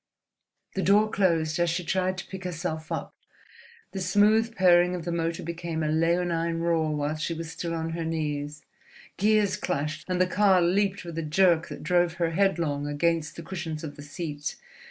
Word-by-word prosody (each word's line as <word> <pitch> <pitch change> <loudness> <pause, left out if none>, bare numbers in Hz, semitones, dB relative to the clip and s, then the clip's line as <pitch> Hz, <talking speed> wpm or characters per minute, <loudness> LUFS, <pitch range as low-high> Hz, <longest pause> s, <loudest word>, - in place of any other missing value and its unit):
The 190 - -1
door 210 +3 +4
closed 165 -4 +1
as 175 0 +2
she 175 +2 -1
tried 185 +2 0
to 185 - -5
pick 190 0 -8
herself 165 -3 -4
up, - - -4 0.8
the 190 - -4
smooth 215 +5 +3
purring 180 -1 +5
of 170 -2 -6
the 175 - -2
motor 165 0 -2
became 170 -1 -4
a 155 - 0
leonine 165 +1 +1
roar 165 -2 +1
while 150 +1 -1
she 165 +2 -2
was 165 0 -6
still 165 0 -4
on 165 0 -3
her 165 0 -3
knees, 150 -2 -3 0.5
gears 210 -1 +3
clashed, 150 +2 -3
and 180 -1 0
the 185 - +5
car 190 0 +4
leaped 195 +3 +1
with 165 -1 -5
a - - 0
jerk 165 +1 +3
that - - -8
drove 175 0 +2
her 170 -1 -1
headlong 165 -6 +1
against 155 +1 0
the 170 - -8
cushions 165 -3 -5
of 145 -2 -6
the - - -10
seat. 145 0 -5
170 Hz, 185 wpm, -27 LUFS, 160-185 Hz, 0.8 s, purring